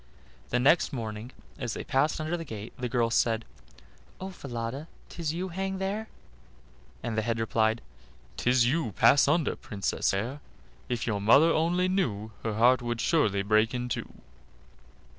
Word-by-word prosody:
The 125 - +1
next 140 +7 +4
morning, 110 -1 -5 0.3
as 120 -4 -3
they - - -4
passed 145 +3 +1
under 155 +2 -1
the 165 - -4
gate, 110 -6 -8
the 125 -2 -4
girl 115 -2 +1
said: 115 -1 +2 0.7
"Oh! 190 +1 -5
Falada, 130 -2 -5 0.2
'tis 165 -3 -3
you 180 +3 -3
hang 190 +2 -3
there;" 200 +3 -3 0.9
and 115 - -2
the 110 - +1
head 115 +1 -1
replied: 110 0 +1 0.5
"'Tis 125 -1 +3
you; 125 -4 0
pass 140 - +5
under, 155 +2 +2
Princess 100 -4 -2
fair: 115 +9 -2 0.5
If 120 -1 -1
your 105 -4 -1
mother 140 +11 +6
only 175 +3 +2
knew, 110 - -1
Her 110 -2 -2
heart 125 +3 +5
would 120 -1 -3
surely 105 - +2
break 110 +3 +3
in 125 0 -3
two." - - -4
125 Hz, 160 wpm, -28 LUFS, 110-160 Hz, 0.9 s, mother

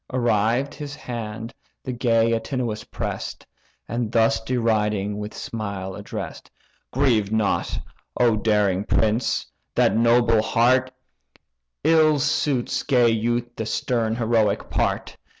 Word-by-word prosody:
Arrived, 120 +2 +1
his 145 -1 -7
hand 115 -3 -6 0.3
the 130 - -4
gay 115 -2 +2
Antinous 115 -1 -2
press'd, - - -5 0.4
And 115 -1 -2
thus 115 -1 +3
deriding, 105 -4 0
with 105 0 -5
a - - -11
smile 100 -4 -5
address'd: - - -7 0.4
"Grieve 120 -7 +2
not, 110 -2 0 0.4
O 120 -3 +4
daring 105 -3 +1
prince! 110 +2 +1 0.3
that 100 - +3
noble 115 -1 +4
heart; 125 +3 +3 0.9
Ill 155 -2 +5
suits 140 -2 0
gay 125 -4 +3
youth 120 +2 -1
the 110 - -4
stern 115 0 0
heroic 115 -3 +1
part. - - -1
115 Hz, 115 wpm, -23 LUFS, 110-125 Hz, 0.9 s, Ill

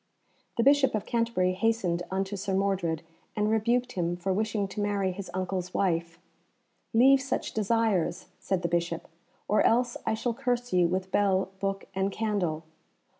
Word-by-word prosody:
The 230 - +3
Bishop 280 -2 +4
of 215 - -2
Canterbury 230 -6 +1
hastened 190 -4 0
unto 195 +1 -2
Sir 195 0 -2
Mordred, 190 -5 0 0.3
and 210 0 +1
rebuked 240 +3 +1
him 175 -3 -1
for 190 +2 -1
wishing 215 0 0
to 210 - -4
marry 200 -2 0
his 195 +1 -7
uncle's 185 -1 -3
wife. 170 -3 0 0.7
"Leave 265 +4 +6
such 270 -1 -3
desires," 220 -4 +1
said 190 -2 -1
the - - +2
Bishop, 170 -1 -1 0.4
"or 210 - +3
else 240 +1 +2
I 220 - 0
shall 235 +2 -1
curse 245 0 -2
you 180 -1 +4
with 185 +2 -2
bell, 195 -2 +2
book, 195 0 -2
and 195 0 0
candle. 190 -8 -1
195 Hz, 160 wpm, -28 LUFS, 185-225 Hz, 0.7 s, Leave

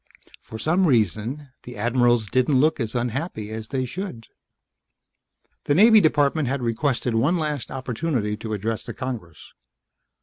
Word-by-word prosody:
For 110 - -9
some 170 - +2
reason 120 - 0
the 125 -2 -10
admirals 120 +1 +2
didn't 130 +5 +2
look 155 +3 +2
as 115 -1 -3
unhappy 120 -2 -3
as 110 0 -6
they 130 +1 -2
should. 125 - -6 1.4
The 145 - +2
Naval 220 +4 +7
Department 150 -2 +2
had 135 0 -2
requested 120 +1 0
one 140 +11 +2
last 150 -4 -3
opportunity 125 -4 -2
to 110 0 -5
address 110 +2 -3
the - - -8
Congress. 115 - -7
125 Hz, 140 wpm, -23 LUFS, 110-150 Hz, 1.4 s, Naval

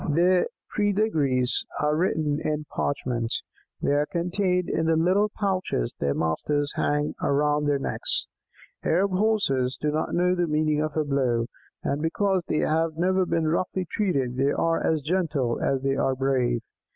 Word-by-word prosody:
Their 175 +4 +3 0.3
pedigrees 160 - +2 0.2
are 150 0 +1
written 155 -3 0
in 150 0 -2
parchment; 120 -5 -2 0.5
they - - +2
are 145 +1 +2
contained 180 +1 0
in 160 - 0
the 165 - +3
little 185 +6 +3
pouches 185 - -1
their 70 -1 0
masters 145 - -1
hang 145 0 0
round 150 +1 +1
their 145 -1 +2
necks. 135 - -1 0.6
Arab 190 +4 +2
Horses 185 -11 +1
do 150 - 0
not 155 +1 -1
know 180 +1 +3
the 175 -1 0
meaning 150 0 +1
of 155 0 -3
a 155 - +2
blow, 130 -5 +1 0.4
and 140 +2 -1
because 190 +4 +1
they 155 - 0
have 160 0 0
never 185 +1 +2
been 165 -2 0
roughly 180 +3 -1
treated 135 - 0
they 135 +2 +2
are 165 0 +1
as 155 -3 +1
gentle 150 -7 0
as 135 -1 0
they 135 0 +1
are 135 -1 +1
brave. 130 -3 +1
155 Hz, 160 wpm, -25 LUFS, 135-180 Hz, 0.6 s, Their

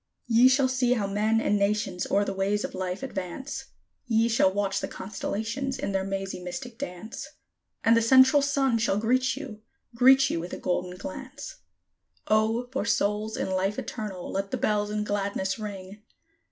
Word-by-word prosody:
Ye 240 +1 +6
shall 265 +1 +4
see 255 -1 +2
how 220 -5 0
men 210 +3 +1
and 210 -2 +1
nations 200 -2 0
o'er 200 +1 +2
the 195 - -2
ways 200 +2 0
of - - -4
life 185 +4 -4
advance; 265 +5 -5 0.4
Ye 230 0 +3
shall 220 -4 +3
watch 195 0 0
the - - -3
constellations 225 +7 -4
in - - -3
their 195 -1 0
mazy, 195 -1 -4
mystic 230 +7 -7
dance; 220 -3 -6 0.6
And 230 - +5
the 230 - +4
Central 260 +4 +6
Sun 275 -4 +1
shall 220 -3 +1
greet 255 +4 +1
you 250 -7 -8 0.3
greet 265 +3 +6
you - - -1
with 175 +2 -6
a - - -3
golden 180 0 -2
glance. 275 - -8 0.7
O, 220 +3 +2
for 265 - -1
souls 210 0 0
in - - -2
Life 190 +2 0
Eternal 205 -6 -5
let 195 0 -2
the - - -2
bells 210 -1 0
in 210 0 -1
gladness 200 -1 -2
ring! 200 -1 -7
215 Hz, 175 wpm, -27 LUFS, 195-250 Hz, 0.7 s, Ye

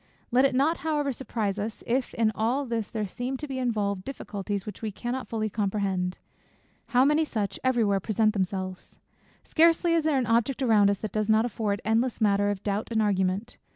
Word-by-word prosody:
Let 255 +3 +5
it 270 - +1
not 300 +6 +2
however 295 -3 -1
surprise 215 -5 -3
us, 215 +2 -5
if 250 +2 -1
in 225 -1 +2
all 245 +7 0
this 230 -4 -2
there 215 -2 -2
seem 250 +7 -4
to 300 - -6
be 265 -2 -4
involved 205 -6 -1
difficulties 205 -6 -5
which 210 -3 -8
we 220 -2 -3
cannot 245 +5 -4
fully 220 -1 -2
comprehend. 195 -3 -1 0.7
How 250 +1 +4
many 300 +2 +3
such 205 -9 -3
every 255 -3 +2
where 200 -2 +2
present 215 +2 +1
themselves! 185 -1 -3 0.4
Scarcely 335 +1 +3
is 330 -2 +2
there 305 -3 +2
an 255 - +1
object 235 +4 +1
around 215 -5 +5
us, 200 - +1
that 215 - -4
does 215 0 -1
not 220 +1 +4
afford 210 -3 -2
endless 230 +3 +1
matter 205 -2 +3
of 205 -1 -3
doubt 205 +1 -2
and 225 -2 0
argument. 200 +1 0
220 Hz, 195 wpm, -27 LUFS, 205-255 Hz, 0.7 s, Let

